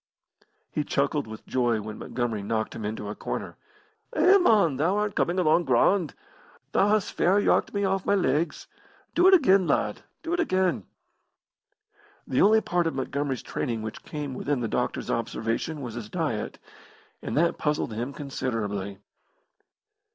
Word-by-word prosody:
He 150 - -1
chuckled 140 -1 0
with 110 0 -9
joy 120 -3 +1
when 105 0 -7
Montgomery 120 -4 -2
knocked 110 +2 -2
him 110 - -6
into 105 0 -4
a 105 - -4
corner. - - -5 0.6
"Eh, 395 +2 +6
mon, 200 - +4
thou 170 +8 +1
art 210 -1 0
coming 175 +2 0
along 175 -1 +3
grand. 150 +6 +2 0.6
Thou 195 - +3
hast 210 -2 +1
fair 190 +4 +3
yarked - - +2
me 200 0 +1
off 190 -1 0
my 200 - +2
legs. 155 -2 0 0.5
Do 355 +2 +5
it 380 - +8
again, 195 - +4
lad, - - 0 0.2
do 335 +1 -2
it 350 - 0
again!" 185 - +1 1.4
The 130 - +1
only 220 +2 +6
part 175 -4 0
of 160 - -2
Montgomery's 135 -1 -2
training 115 -3 -3
which 110 - -6
came 145 -3 -5
within 135 0 -2
the 115 - -1
doctor's - - -2
observation 115 +7 -2
was 120 -4 -5
his 110 -2 -7
diet, 150 -12 -2 0.6
and - - -3
that 170 +2 +2
puzzled 150 -6 -1
him 120 +5 -3
considerably. 105 -9 -3
145 Hz, 160 wpm, -26 LUFS, 115-190 Hz, 1.4 s, it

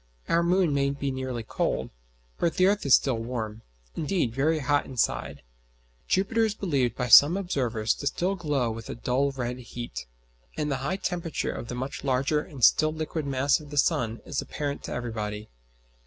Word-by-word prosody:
Our 170 - +3
moon 175 -2 +2
may 140 0 +2
be 140 0 -2
nearly 130 -3 -4
cold, - - -2 0.5
but 170 - +1
the 185 - +4
earth 200 -5 +2
is 135 - +9
still 130 -5 +1
warm 115 -2 -4 0.3
indeed, 160 -7 0
very 150 +5 +2
hot 145 -1 +1
inside. 70 - -2 0.6
Jupiter 210 +4 +2
is 215 -2 0
believed 135 - 0
by 125 - -2
some 145 - +8
observers 125 - -1
still 180 +7 0
to 185 - -13
glow 140 -7 0
with 115 0 -8
a - - -4
dull 125 +4 0
red 125 -2 -4
heat; 120 - -7 0.5
and 150 -1 -1
the 135 - 0
high 140 +9 -2
temperature 175 -4 -2
of 120 - -6
the 125 - -5
much 130 +2 -5
larger 135 +3 +1
and 140 -4 -9
still 155 +6 +5
liquid 155 -1 -4
mass 135 +1 +2
of 150 -2 -12
the 145 - -7
sun 115 -4 +1
is 140 - -2
apparent 145 -1 -4
to - - -6
everybody. 110 -3 -4
140 Hz, 185 wpm, -27 LUFS, 120-155 Hz, 0.6 s, is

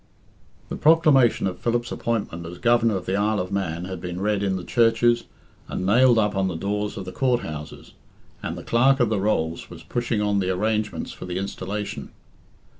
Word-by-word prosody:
The - - -4
proclamation 150 - +4
of 95 -2 -3
Philip's 120 0 -1
appointment 105 -7 -2
as 90 +1 -8
Governor 115 0 +3
of 95 - -4
the 95 - -1
Isle 105 +1 +1
of 90 +1 -4
Man 90 -3 -2
had 95 0 -6
been 90 0 -5
read 105 0 0
in 95 -2 0
the 90 - -4
churches, 120 +2 +2 0.4
and 90 - -4
nailed 120 +4 +5
up 105 -2 +2
on 95 -1 +1
the 90 - -3
doors 105 +4 -2
of 95 - -5
the 90 - -6
Court 125 +3 +1
houses, 75 0 -8 0.5
and - - -4
the - - -8
Clerk 130 +4 +3
of 120 -3 +3
the 105 -3 0
Rolls 85 -6 -1
was - - -11
pushing 120 -2 -2
on 105 -1 +1
the 95 -1 -1
arrangements 105 +3 -1
for - - -9
the 90 0 -3
installation. 100 +1 -4
105 Hz, 195 wpm, -24 LUFS, 95-120 Hz, 0.5 s, nailed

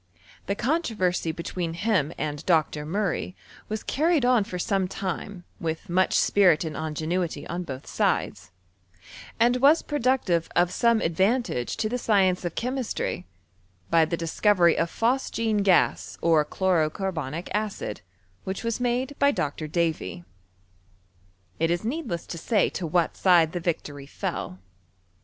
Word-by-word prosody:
The 200 - 0
controversy 210 - 0
between 170 +1 -4
him 180 -6 +1
and 150 -1 -3
Dr. 155 -3 +1
Murray 185 0 -2 0.3
was 215 0 -3
carried 315 -2 +1
on 245 -4 +4
for 185 -2 -6
some 190 +1 0
time 185 0 -5 0.2
with 160 0 -4
much 185 +2 +2
spirit 180 -6 +4
and 155 -2 -5
ingenuity 160 +3 -2
on 175 +1 -4
both 135 -6 -7
sides, - - -1 0.9
and 240 +2 +4
was 285 +5 +5
productive 255 - 0
of 175 0 +3
some 235 +1 +2
advantage 190 - 0
to 215 - 0
the 250 +3 -2
science 190 -5 +2
of 175 - -4
chemistry, 245 - -3 0.6
by 165 -1 +5
the 165 +2 -2
discovery 170 +1 +3
of 165 - 0
phos 245 +7 0
gene 225 -2 0
gas 195 -3 +2
or 160 -2 +4
chlorocarbonic 170 -3 -1
acid, 210 - -3 0.4
which 190 +4 -4
was 230 0 -1
made 250 +3 -1
DT 280 0 +4
Dr. 150 +1 -2
Davy. 155 - -2 1.4
It 165 +1 +2
is 175 +4 -1
needless 235 - -3
to 170 - -7
say 210 +3 +2
to 175 - -4
what 170 +1 +1
side 170 -4 +4
the 175 - -4
Tictory 145 -4 -3
fell. 90 - -4
180 Hz, 140 wpm, -26 LUFS, 165-225 Hz, 1.4 s, was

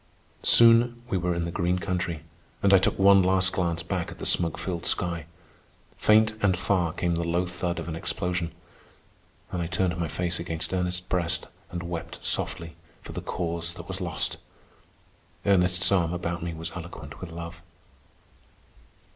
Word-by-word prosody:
Soon 120 +1 +6
we 95 - +1
were 90 0 0
in 85 0 -1
the 85 - -3
green 90 +2 0
country, 90 -4 -2 0.4
and 100 0 +5
I 95 - +8
took - - +1
one 100 0 +7
last 95 0 +3
glance 85 -2 0
back 90 0 -2
at - - -10
the - - -6
smoke 85 -3 +3
filled 85 -3 -3
sky. 85 -3 0 0.7
Faint 110 +1 +4
and 95 -3 +3
far 90 -2 +1
came 85 +2 -1
the 85 0 -1
low 85 +2 0
thud 90 -1 -3
of 85 - -5
an 80 - -3
explosion. 85 0 -1 1.0
Then 90 - -2
I 85 - -2
turned 90 +1 0
my 85 - 0
face 90 +2 -2
against 85 +1 -4
Ernest's 90 -1 +1
breast 90 -2 -1 0.2
and 85 0 -5
wept 85 -1 -5
softly 85 -1 -2 0.3
for - - -9
the - - -5
Cause 85 -1 -3
that - - -9
was 95 0 -5
lost. 85 -3 -1 1.1
Ernest's 90 -2 +3
arm 85 -3 +2
about 85 0 -3
me 85 -1 -4
was 80 +1 -5
eloquent 85 0 -9
with 90 - -7
love. 85 0 -8
85 Hz, 170 wpm, -27 LUFS, 85-90 Hz, 1.1 s, I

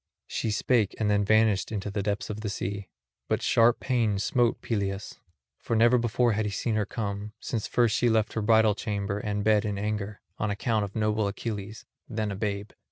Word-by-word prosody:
She 115 - -2
spake, 110 0 +1
and 105 -2 +2
vanished 110 -2 +3
into 105 -1 -3
the 100 0 -1
depths 105 +1 -2
of 105 +1 -6
the 105 - -3
sea; 100 0 -4 0.4
but - - 0
sharp 115 +1 +4
pain 115 -6 +1
smote 120 +3 +1
Peleus, 100 -3 -3 0.4
for 115 - -2
never 120 +2 +5
before 120 +1 +2
had 110 +1 0
he 105 - -2
seen 110 +3 -1
her 105 -2 0
come, 105 -1 -4
since 110 -3 -3
first 120 -3 +2
she 120 - +3
left 110 -2 +1
her 110 - -1
bridal 110 0 +4
chamber 100 -1 -3
and 105 -1 -2
bed 105 -1 +4
in 105 -2 -2
anger, 105 0 -3 0.2
on 105 - 0
account 110 +1 0
of 100 - -10
noble 110 -1 +1
Achilles, 105 0 -5 0.2
then 110 -3 -2
a - - -3
babe. 100 0 -3
105 Hz, 195 wpm, -27 LUFS, 100-110 Hz, 0.4 s, never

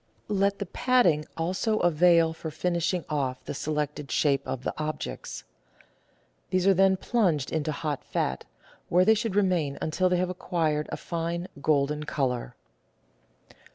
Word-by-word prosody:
Let 200 -1 +1
the 200 - -3
patting 180 - +2
also 185 +6 0
avail 170 -2 +4
for 160 0 -6
finishing 175 +2 -1
off 135 -4 -2
the - - -4
selected 150 -1 -3
shape 140 -1 +2
of 130 - -4
the - - -2
objects. 155 0 -5 1.1
These 185 0 +1
are 195 - +6
then 190 +1 +4
plunged 180 - +1
into 155 -1 -1
hot 150 -1 -3
fat, 65 - -2 0.4
where 180 +1 +4
they 220 - +6
should 220 -2 -2
remain 180 -8 +1
until 185 +4 +1
they 180 - +2
have 180 0 0
acquired 160 -4 -1
a - - -3
fine, 170 +1 -3
golden 150 0 +1
colour. 125 -5 -2
165 Hz, 145 wpm, -27 LUFS, 150-185 Hz, 1.1 s, are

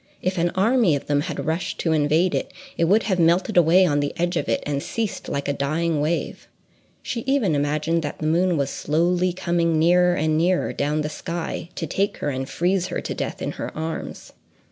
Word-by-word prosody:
If 185 0 -2
an 175 +1 +2
army 215 - +3
of 140 - -5
them 145 -1 +1
had - - -4
rushed 165 +3 -2
to 165 - 0
invade 155 +4 +2
it, - - -2 0.2
it 165 - +1
would 205 +6 +3
have 190 -4 0
melted 170 +2 +2
away 175 +2 +6
on 145 -4 +1
the 145 0 -1
edge 175 +1 0
of 165 - -1
it, 115 - 0
and 140 -1 -1
ceased 225 +4 -4
like 140 - -3
a 140 - +1
dying 155 +3 0
wave.—She 170 +8 -5
even 265 - +2
imagined 150 +3 0
that 145 -2 -5
the 155 - -5
moon 170 +2 +2
was 140 -1 -1
slowly 175 +4 +1
coming 170 -2 0
nearer 175 +2 +4
and 155 0 +1
nearer 180 +2 +1
down 150 +2 0
the 150 - -2
sky 170 0 -5
to - - -3
take 200 +1 -1
her 145 - -2
and 130 +1 -4
freeze 180 +1 0
her - - -3
to - - -4
death - - -4
in - - -2
her - - -5
arms. 160 +1 -5
165 Hz, 210 wpm, -23 LUFS, 150-180 Hz, 0.2 s, away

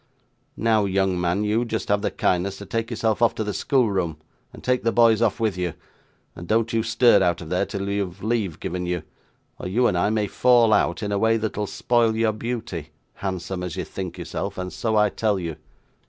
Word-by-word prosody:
Now, 110 -2 +2
young 95 -2 +1
man, 90 +4 +1
you 105 +3 +1
just 115 -2 -3
have 100 0 +2
the - - 0
kindness 95 +2 0
to 100 - -9
take 115 0 -2
yourself 110 -1 -1
off 115 - +4
to 110 - -2
the 105 -1 -3
schoolroom, 95 - +1 0.3
and - - -13
take 125 -1 +1
the 115 - +1
boys 115 -1 +4
off 115 0 +1
with 110 -4 0
you, 90 -3 -2 0.6
and 85 - -9
don't 115 +2 +1
you 115 - +2
stir 115 -2 +4
out 85 -2 +2
of 80 - -8
there 90 +3 0
till 100 -2 -4
you 100 0 0
have 90 +2 -14
leave 110 -7 -1
given 90 0 -3
you, 90 -2 -2 0.6
or - - -5
you 115 +7 +2
and 90 - +2
I 90 +4 +2
may 110 -1 +1
fall 120 +1 +4
out 100 0 +1
in 105 - -2
a 100 - +1
way 115 +1 +3
that'll 105 -1 -2
spoil 115 0 +1
your 110 -1 +2
beauty, 110 -8 -5 0.2
handsome 95 -1 -4
as 90 -3 -4
you - - -3
think 90 -3 -6
yourself, - - -4
and 90 0 -4
so 110 -2 -1
I 105 -1 +4
tell 105 0 0
you. 85 -3 -4
105 Hz, 220 wpm, -24 LUFS, 90-115 Hz, 0.6 s, off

